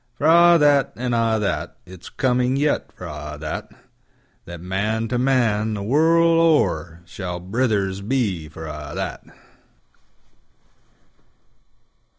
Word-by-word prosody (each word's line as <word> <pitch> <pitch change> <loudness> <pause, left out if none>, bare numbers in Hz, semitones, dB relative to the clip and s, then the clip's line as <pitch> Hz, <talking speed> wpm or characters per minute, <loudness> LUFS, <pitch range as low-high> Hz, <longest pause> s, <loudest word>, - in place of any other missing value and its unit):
For 145 - -4
a' 170 +1 +6
that, 145 -4 +3
an' 125 0 -3
a' 115 -1 +1
that, 105 - -3
It's 90 -1 -12
coming 125 0 0
yet 145 +1 0
for - - -11
a' 75 0 -7
that, 75 0 -6 0.7
That 85 0 -9
Man 105 +6 -2
to 125 - -1
Man, 115 -5 +1
the 100 - -5
world 165 +7 +3
o'er, 85 - +1
Shall 90 -1 -6
brothers 100 -1 -1
be 100 - -2
for 80 +1 -9
a' 75 -1 -7
that. - - -5
110 Hz, 125 wpm, -21 LUFS, 90-135 Hz, 0.7 s, a